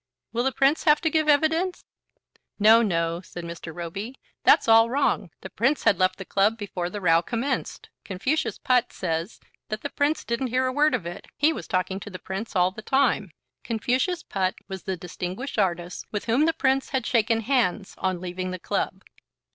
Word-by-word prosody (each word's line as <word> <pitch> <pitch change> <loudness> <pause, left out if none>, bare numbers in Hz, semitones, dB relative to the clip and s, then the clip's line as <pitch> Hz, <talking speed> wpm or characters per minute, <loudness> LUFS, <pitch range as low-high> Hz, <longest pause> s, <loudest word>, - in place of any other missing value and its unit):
"Will 235 +1 0
the 265 - +1
Prince 275 +6 +2
have 300 -2 +6
to 320 - +1
give 310 -1 +2
evidence?" 320 +5 +2 0.7
"No, 220 +2 +7
no," 170 -5 0
said 175 -2 -9
Mr. 170 -1 -7
Roby. 175 +9 -6 0.3
"That's - - +5
all 225 0 +6
wrong. 280 +4 +1
The - - -8
Prince 270 +5 +1
had 195 - +3
left 185 0 +2
the 195 - -7
club 205 +4 +2
before 185 -5 -4
the 205 - -5
row 165 -3 +4
commenced. 250 +7 -3
Confucius 235 +11 -1
Putt 250 -2 +2
says 165 +2 -3 0.3
that 215 0 -4
the 285 - -4
Prince 295 +2 0
didn't 235 +3 -1
hear 255 +2 +1
a 255 - -1
word 295 0 +3
of 205 -9 -4
it. 175 +1 -7
He 310 +3 +3
was - - -7
talking 185 +1 -1
to 205 - -8
the 185 - -7
Prince 190 +5 -6
all 180 0 +3
the 205 - -9
time." 250 -5 +1 0.3
Confucius 255 - -1
Putt 190 -2 -1
was 190 -1 -6
the 190 -1 -2
distinguished 180 +9 -5
artist 175 -2 -1
with 205 - -3
whom 245 +6 +3
the 325 - +2
Prince 270 -3 +1
had 265 -4 -1
shaken 225 -1 +2
hands 220 -5 0
on 185 -2 -1
leaving 185 +1 -4
the 185 - -4
club. - - -3
220 Hz, 195 wpm, -25 LUFS, 185-265 Hz, 0.7 s, No